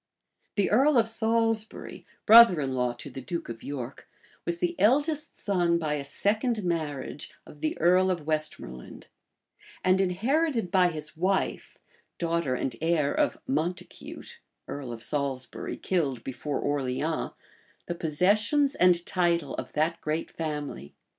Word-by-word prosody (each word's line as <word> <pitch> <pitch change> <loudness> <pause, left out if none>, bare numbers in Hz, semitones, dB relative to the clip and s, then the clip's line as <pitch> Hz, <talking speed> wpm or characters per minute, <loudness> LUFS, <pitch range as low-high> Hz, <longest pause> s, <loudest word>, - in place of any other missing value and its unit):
The 200 - +1
earl 270 +6 +5
of 225 -2 +4
Salisbury, 225 -1 -1 0.2
brother 225 -6 +9
in 135 -2 -1
law 125 -1 0
to 120 +4 -10
the 135 - -7
duke 170 +3 -5
of 115 -1 -7
York, 135 -2 -7 0.4
was 170 0 -1
the 175 0 -1
eldest 290 - +2
son 175 -4 +1
by 155 -3 -1
a 145 -1 -2
second 215 - 0
marriage 150 -5 -3
of 150 - -14
the 155 - -1
earl 180 +3 +4
of 170 -5 -2
Westmoreland; 155 - -4 0.8
and 185 +1 +4
inherited 230 - +1
by 185 -2 +5
his 155 -2 -6
wife, 190 +4 -1 0.4
daughter 170 -6 0
and 125 -1 -2
heir 160 -3 +2
of - - +1
Montacute, 170 +6 -4 0.3
earl 135 -4 -5
of 115 -1 -7
Salisbury, 135 -4 -3
killed 145 -9 -1
before 140 +2 -3
Orleans, 145 +2 -1 0.5
the - - -3
possessions 205 - +2
and 175 -1 +3
title 170 -5 +1
of - - -5
that 160 +2 0
great 155 +2 -2
family. 150 - -5
170 Hz, 140 wpm, -27 LUFS, 145-195 Hz, 0.8 s, brother